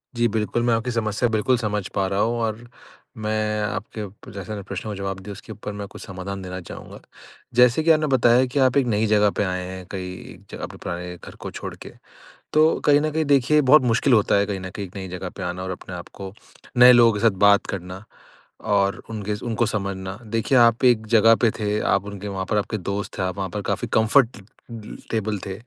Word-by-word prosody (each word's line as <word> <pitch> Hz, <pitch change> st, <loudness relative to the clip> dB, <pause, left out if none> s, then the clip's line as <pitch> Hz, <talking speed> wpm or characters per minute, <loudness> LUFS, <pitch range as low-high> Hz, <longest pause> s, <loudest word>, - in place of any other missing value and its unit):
जी 120 Hz, 0 st, +2 dB
बिल्कुल, 110 Hz, +1 st, -1 dB
मैं 120 Hz, -1 st, +2 dB
आपकी 115 Hz, +2 st, -1 dB
समस्या 110 Hz, 0 st, 0 dB
बिल्कुल 115 Hz, +3 st, +2 dB
समझ 105 Hz, -4 st, -2 dB
पा 95 Hz, -, +1 dB
रहा 100 Hz, +1 st, -1 dB
हूँ 115 Hz, +2 st, +1 dB
और 110 Hz, +1 st, -2 dB, 0.6 s
मैं 105 Hz, 0 st, 0 dB
आपके 105 Hz, +1 st, -4 dB
अप 105 Hz, 0 st, -10 dB
जैसे 100 Hz, +1 st, -6 dB
प्रश्नों 105 Hz, +2 st, -5 dB
का 100 Hz, -, -6 dB
जवाब 95 Hz, -1 st, -4 dB
दिया 100 Hz, +2 st, -9 dB
उसके 100 Hz, +3 st, -10 dB
ऊपर 105 Hz, -1 st, -7 dB
मैं 100 Hz, -1 st, -5 dB
कुछ -, -, -12 dB
समाधान 95 Hz, +1 st, -6 dB
देना 90 Hz, 0 st, -6 dB
चाहूँगा। -, -, -10 dB, 0.6 s
जैसे 125 Hz, +5 st, +5 dB
कि 165 Hz, -, +5 dB
आपने 155 Hz, -1 st, +3 dB
बताया 125 Hz, -1 st, +4 dB
कि 130 Hz, +3 st, -2 dB
आप 130 Hz, 0 st, +3 dB
एक 135 Hz, -, +3 dB
नई 110 Hz, 0 st, +1 dB
जगह 105 Hz, -1 st, +4 dB
पे -, -, +2 dB
आए 90 Hz, -1 st, -2 dB
हैं 95 Hz, 0 st, -8 dB
कई 90 Hz, -1 st, -7 dB, 0.2 s
ज -, -, -5 dB
अपने -, -, -7 dB
पुराने 90 Hz, 0 st, -5 dB
घर -, -, -12 dB
को -, -, -8 dB
छोड़ -, -, -6 dB
के। -, -, -11 dB, 0.6 s
तो 155 Hz, +1 st, +5 dB, 0.2 s
कहीं 145 Hz, 0 st, +5 dB
न 155 Hz, +1 st, 0 dB
कहीं 160 Hz, +1 st, 0 dB
देखिए 145 Hz, +1 st, +4 dB
बहुत 145 Hz, +1 st, +6 dB
मुश्किल 125 Hz, +2 st, +2 dB
होता 105 Hz, -3 st, +4 dB
है 100 Hz, 0 st, +2 dB
कहीं 100 Hz, -2 st, -3 dB
न 95 Hz, 0 st, -6 dB
कहीं 100 Hz, -2 st, -5 dB
एक 90 Hz, -, -15 dB
नई 95 Hz, -1 st, -5 dB
जगह 90 Hz, +1 st, -5 dB
पे 95 Hz, -, -6 dB
आना 90 Hz, +1 st, -4 dB
और 95 Hz, -, -4 dB
अपने 90 Hz, 0 st, -7 dB
आपको 95 Hz, +2 st, -8 dB, 0.4 s
नए 125 Hz, +1 st, +9 dB
लोगों 120 Hz, -2 st, +6 dB
के 105 Hz, -, -3 dB
साथ 110 Hz, -4 st, +3 dB
बात 100 Hz, 0 st, +5 dB
करना। 95 Hz, +2 st, -7 dB, 0.7 s
और 100 Hz, 0 st, +2 dB
उनके 105 Hz, -1 st, -3 dB
उनको 115 Hz, 0 st, 0 dB
समझना। 100 Hz, -2 st, -3 dB
देखिए, 115 Hz, +4 st, 0 dB
आप 115 Hz, +1 st, +4 dB
एक 115 Hz, -3 st, +4 dB
जगह 115 Hz, 0 st, +6 dB
पे 115 Hz, -, +5 dB
थे 105 Hz, 0 st, -1 dB
आप -, -, +2 dB
उनके 100 Hz, 0 st, -6 dB
वहाँ 95 Hz, -1 st, -3 dB
पर 105 Hz, -, +1 dB
आपके 110 Hz, +2 st, -2 dB
दोस्त 100 Hz, +1 st, -4 dB
थे। -, -, 0 dB
आप 95 Hz, +1 st, -2 dB
वहाँ 95 Hz, -1 st, -3 dB
पर 105 Hz, -, -4 dB
काफ़ी 100 Hz, 0 st, -1 dB
कम्फर्टे 115 Hz, +1 st, +3 dB, 0.3 s
ल 110 Hz, -2 st, -8 dB
टेबल 110 Hz, -2 st, -1 dB
थे, 95 Hz, -, -5 dB
105 Hz, 225 wpm, -23 LUFS, 95-120 Hz, 0.7 s, नए